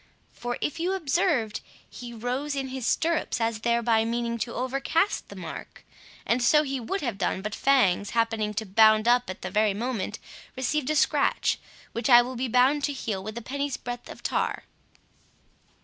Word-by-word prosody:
For, 240 0 -4
if 295 - -2
you 360 +3 0
observed, 310 - 0 0.3
he 245 -1 -9
rose 250 +5 -3
in 270 -1 -3
his 255 -2 -4
stirrups, 330 -5 0
as 225 -1 0
thereby 235 -1 +2
meaning 235 0 -2
to 235 - -3
overcast 275 +9 0
the - - -10
mark; - - -9 0.4
and 235 +2 +1
so 300 +5 +5
he 270 -2 -3
would 385 - -3
have 235 -7 -3
done, 190 - -1
but 210 0 -4
Fangs 205 -9 +3
happening 225 -2 0
to 220 +1 -2
bound 215 +2 +5
up 245 -1 +3
at 185 - -7
the - - -4
very 210 -1 +2
moment, 225 -2 -3 0.4
received 265 +2 -1
a 310 - +1
scratch, 285 - +2 0.3
which 235 +4 -2
I 240 -1 +9
will 255 +1 -6
be 255 +2 -2
bound 255 +5 +3
to 290 - -2
heal 215 -7 -3
with 215 +3 -6
a 235 - -6
penny's 280 +2 -3
breadth 245 0 -7
of - - -11
tar." - - -1
240 Hz, 180 wpm, -26 LUFS, 225-275 Hz, 0.4 s, I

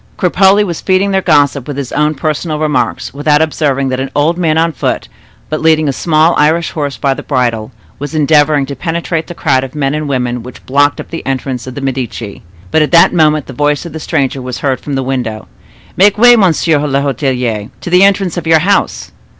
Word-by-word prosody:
Cropole 195 +2 +3
was 170 -4 -5
feeding 190 +1 +1
their 190 0 +1
gossip 145 -6 +2
with 145 -2 -5
his 140 -3 -5
own 150 +1 0
personal 155 +2 -2
remarks, 155 -1 -1
without 150 +1 +2
observing 145 -4 0
that 130 0 -2
an 135 0 -3
old 150 +4 +2
man 165 -3 0
on 165 +1 +2
foot, - - -3 0.4
but 155 - -3
leading 155 -1 +3
a 140 - 0
small 160 +3 +2
Irish 160 +3 +2
horse 145 -3 -4
by 135 -1 0
the - - -7
bridle, 120 -4 -1 0.3
was 145 +3 -6
endeavoring 150 -1 +3
to 140 +1 -6
penetrate 165 +2 -3
the 175 - -8
crowd 135 -6 +1
of 135 +2 -8
men 140 -1 -1
and 150 -1 -3
women 125 -2 -2
which 125 +2 -12
blocked 145 +2 +2
up - - -9
the 165 - -5
entrance 130 -2 -3
to - - -6
the 130 +2 -7
Medici. 125 -5 -4 0.3
But 160 - +3
at 150 - 0
that 170 - +6
moment 155 -4 +2
the 130 - -9
voice 145 +4 0
of 170 - -8
the 160 - -6
stranger 135 -2 -1
was 125 -1 -5
heard 135 -2 0
from 145 - -5
the 135 - -1
window. 125 -5 -4 0.5
"Make 205 +2 +4
way, 245 +2 +7
monsieur 165 -6 +2
l'hotelier, 135 -6 -1
to - - -5
the 180 +1 +5
entrance 195 -3 +2
of 170 - -4
your 160 0 +5
house!" 190 +6 0
150 Hz, 215 wpm, -13 LUFS, 135-165 Hz, 0.5 s, way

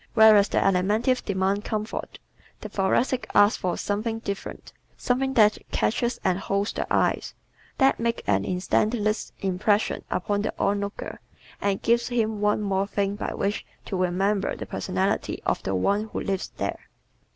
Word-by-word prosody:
Whereas 215 -2 +7
the - - -1
Alimentives 210 +7 +2
demand 195 +1 0
comfort, 215 0 -4 0.4
the - - -6
Thoracics 235 +6 0
ask 205 +1 +5
for 180 - -1
"something 220 +3 -2
different," 200 -3 -6 0.2
something 265 +2 0
that 210 -3 +5
catches 240 +2 0
and 185 -1 +1
holds 200 +1 -1
the - - -4
eye - - +2 0.6
that 270 -1 +3
makes 230 0 -1
an 100 -1 +2
instantaneous 215 - 0
impression 200 +3 +1
upon 205 +2 -1
the - - -3
onlooker 200 0 -2 0.4
and 200 -1 0
gives 235 +1 +2
him 220 -3 -1
one 210 0 +2
more 195 -1 0
thing 200 0 -1
by 210 - -4
which 200 +2 -1 0.2
to 195 - -4
remember 190 +3 0
the - - -6
personality - - -1
of - - 0
the 95 - -2
one 200 - +1
who 220 - -5
lives 195 -1 -2
there. - - -2
205 Hz, 150 wpm, -25 LUFS, 195-220 Hz, 0.6 s, Whereas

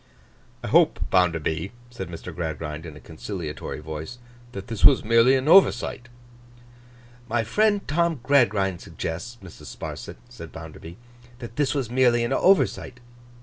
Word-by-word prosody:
'I - - -4
hope, - - +4
Bounderby,' 85 -1 +1 0.2
said 95 -7 -7
Mr. 80 -2 -8
Gradgrind, 80 -1 -5
in 80 - -10
a - - -12
conciliatory 80 -3 -7
voice, 80 +8 -7 0.3
'that 100 -4 -7
this 115 -3 -6
was 140 - +7
merely 115 +3 +5
an 130 +2 -1
oversight.' 140 -8 +4 1.2
'My 115 0 +1
friend 205 - +1
Tom 165 -1 0
Gradgrind 100 -10 +2
suggests, 90 +9 -6
Mrs. 95 - -12
Sparsit,' - - -7
said - - -11
Bounderby, 80 +1 -10 0.4
'that 120 -2 -10
this 145 -1 0
was 130 -5 -2
merely 120 -2 +3
an 120 +3 -1
oversight. 175 -7 +2
115 Hz, 140 wpm, -24 LUFS, 80-130 Hz, 1.2 s, was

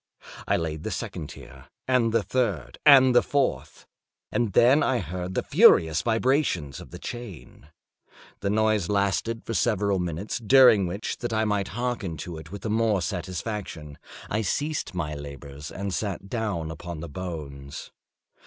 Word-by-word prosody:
I - - +3
laid 80 -2 -3
the - - -4
second 75 - -5
tier, - - -12 0.2
and 125 -3 +3
the 115 -1 +2
third, 105 - -2
and 130 -3 +8
the 120 - +6
fourth; 140 -2 -1 0.5
and 115 -5 0
then 130 +9 +5
I 130 - +2
heard 90 -1 -5
the - - 0
furious 80 0 +5
vibrations 115 - 0
of - - -11
the - - -9
chain. 115 - -9 0.7
The 100 - -1
noise 110 -3 +1
lasted 105 +3 0
for 115 - -4
several 100 -4 +1
minutes, 90 +5 -3
during 120 -4 +6
which, 100 +5 -4
that 120 -1 -3
I 110 0 +1
might 105 -2 0
hearken 120 -9 -2
to 80 +2 -6
it 80 +1 -12
with 100 - -8
the 110 - -2
more 110 -4 +2
satisfaction, 90 -4 -5 0.3
I 110 - -1
ceased 145 - -2
my 75 -4 -2
labors 70 0 -8
and 100 -1 -4
sat 95 -2 -3
down 100 -9 -2
upon 80 0 -7
the 85 - -6
bones. 75 -5 -7
100 Hz, 160 wpm, -26 LUFS, 85-115 Hz, 0.7 s, and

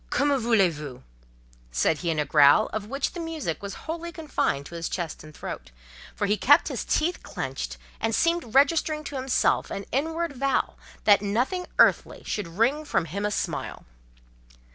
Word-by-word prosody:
"Que 280 - +1
me 285 -1 +3
voulez 225 -8 +3
vous?" 145 -4 -8 0.7
said 150 - +1
he 170 - -2
in 160 - 0
a 150 - +1
growl 145 +7 +5
of 215 -1 -3
which 275 +4 -2
the 350 - -6
music 320 - -4
was 200 -2 -6
wholly 335 +1 -4
confined 300 - -1
to 170 - -11
his 170 -1 -4
chest 170 -5 -4
and 155 - -12
throat, - - -7 0.5
for 205 - -1
he 205 +1 +1
kept - - +5
his - - -3
teeth 345 +3 0
clenched; - - -5 0.2
and 225 -1 0
seemed 335 -8 0
registering 305 +2 +3
to 290 - -7
himself 260 -1 +1
an 195 - -5
inward 320 +4 -1
vow 275 +1 0 0.3
that 205 -2 +6
nothing 250 - -1
earthly - - +3
should 210 -4 -3
wring 230 - +1
from 240 - 0
him 200 +6 -2
a - - -1
smile. 210 - -4
230 Hz, 180 wpm, -26 LUFS, -, 0.7 s, that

